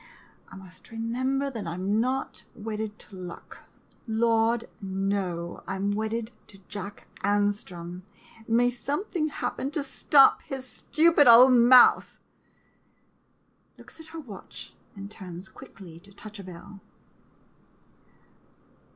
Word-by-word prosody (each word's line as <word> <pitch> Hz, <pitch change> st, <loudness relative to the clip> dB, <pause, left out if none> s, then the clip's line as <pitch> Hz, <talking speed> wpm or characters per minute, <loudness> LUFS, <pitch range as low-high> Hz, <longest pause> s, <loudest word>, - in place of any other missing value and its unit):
I -, -, -13 dB
must 190 Hz, -1 st, -14 dB
remember 255 Hz, +5 st, -2 dB
that 220 Hz, -7 st, -6 dB
I 165 Hz, -, -4 dB
'm 200 Hz, +4 st, 0 dB
not 260 Hz, +2 st, -3 dB
wedded 215 Hz, -1 st, -5 dB
to 200 Hz, -, -13 dB
luck 180 Hz, -2 st, -10 dB, 0.2 s
— -, -, -33 dB
Lord, 225 Hz, +1 st, +2 dB, 0.2 s
no 190 Hz, -3 st, -3 dB
— -, -, -30 dB
I 190 Hz, -, -3 dB
'm 200 Hz, +1 st, -1 dB
wedded 220 Hz, +2 st, -2 dB, 0.2 s
to 200 Hz, -, -16 dB
Jack 200 Hz, 0 st, -8 dB, 0.2 s
An 205 Hz, 0 st, +3 dB
strom, 180 Hz, -3 st, -9 dB, 0.2 s
— 225 Hz, -1 st, -21 dB
may 240 Hz, +2 st, +3 dB
something 305 Hz, -, -2 dB
happen 275 Hz, -2 st, -3 dB
to 300 Hz, 0 st, -2 dB
stop 275 Hz, 0 st, +4 dB
his 265 Hz, -1 st, -7 dB
stupid 310 Hz, +2 st, +3 dB
old 245 Hz, +2 st, +9 dB
mouth! 245 Hz, +1 st, +6 dB, 1.6 s
[Looks -, -, -15 dB
at 320 Hz, -, -9 dB
her 325 Hz, 0 st, -8 dB
watch, 215 Hz, -, -10 dB, 0.2 s
and 200 Hz, 0 st, -9 dB
turns 185 Hz, -3 st, -9 dB
quickly 170 Hz, -4 st, -13 dB
to 200 Hz, +3 st, -19 dB
touch 210 Hz, +1 st, -11 dB
a -, -, -8 dB
bell. 185 Hz, +2 st, -11 dB
220 Hz, 135 wpm, -27 LUFS, 195-250 Hz, 1.6 s, old